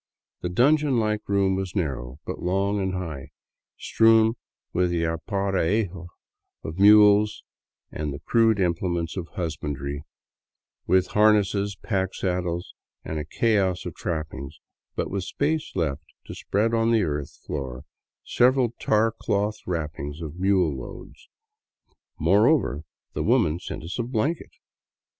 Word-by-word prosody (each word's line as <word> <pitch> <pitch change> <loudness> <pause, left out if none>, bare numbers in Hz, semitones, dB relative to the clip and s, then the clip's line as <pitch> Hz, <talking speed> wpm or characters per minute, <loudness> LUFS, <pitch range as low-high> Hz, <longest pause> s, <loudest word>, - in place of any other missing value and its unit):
The 90 - -2
dungeon 140 - +3
like 105 -2 -1
room 100 -1 +2
was 95 0 -4
narrow, 65 -8 -3
but - - -5
long 100 +3 0
and 95 -1 -1
high, 80 -7 -5 0.5
strewn 110 0 +4 0.4
with 90 0 +2
the 85 -1 0
aparejo 95 +2 -1 0.6
of 80 +3 -6
mules 105 +1 +6 0.5
and 75 -1 -3
the 70 - -5
crude 115 - +2
implements 85 -2 -1
of 90 -3 -4
husbandry, 70 -4 -4 0.9
with 95 -1 +4
harnesses, 105 -1 +3
pack 95 -3 -1
saddles 90 -2 -2 0.3
and 80 - -3
a 75 - -4
chaos 100 -1 +1
of - - -5
trappings, 75 -4 -5 0.4
but - - -2
with 95 -1 -2
space 155 +6 -1
left 75 -5 -1 0.2
to - - -8
spread 110 +3 0
on 115 0 +2
the 115 -3 +3
earth 75 -4 -3
floor 65 -4 -5 0.4
several 125 -1 +3
tar 110 +1 +2
cloth 105 -1 -1
wrappings 75 -3 -4
of 80 +1 -7
mule 95 -6 +2
loads. 65 - -10 0.9
Moreover, 100 - +3 0.3
the - - -2
woman 80 +3 +2
sent 90 - -7
us 85 +8 -5
a. - - +1
blanket. 125 +7 -1
95 Hz, 130 wpm, -25 LUFS, 80-105 Hz, 0.9 s, mules